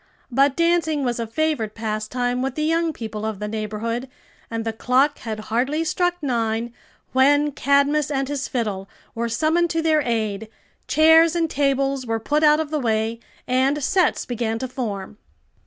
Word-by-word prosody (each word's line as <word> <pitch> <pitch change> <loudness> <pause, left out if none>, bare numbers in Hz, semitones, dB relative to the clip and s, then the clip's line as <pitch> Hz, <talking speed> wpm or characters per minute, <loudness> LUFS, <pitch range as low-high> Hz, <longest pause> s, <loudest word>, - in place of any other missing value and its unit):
But 275 +2 +3
dancing 335 -3 +1
was 240 -2 -1
a 230 - -2
favorite 235 -4 -1
pastime 230 +3 -2
with 265 0 -2
the 305 - -1
young 330 +1 +1
people 220 -6 -6
of 220 -2 -3
the 210 +1 -4
neighborhood, 220 +3 -3 0.4
and 225 -1 -3
the 225 - -2
clock 260 +6 +2
had 220 -2 -5
hardly 270 +8 +1
struck 355 +2 0
nine 230 -2 -1 0.4
when 290 +3 +4
Cadmus 280 +1 +2
and 275 -2 -1
his 280 -1 -3
fiddle 205 -6 -3 0.2
were 235 0 -2
summoned 320 +8 +1
to 325 0 0
their 310 -1 +3
aid, 220 -4 -2 0.4
chairs 320 +1 +5
and 335 -1 +1
tables 275 -2 0
were 225 0 -1
put 295 +7 0
out 300 0 +5
of 310 -2 -3
the 305 - 0
way, 225 -2 -1 0.3
and 270 +3 +1
sets 360 +4 +2
began 230 -2 -2
to 260 - -4
form. 215 -5 -5
260 Hz, 170 wpm, -22 LUFS, 225-300 Hz, 0.4 s, chairs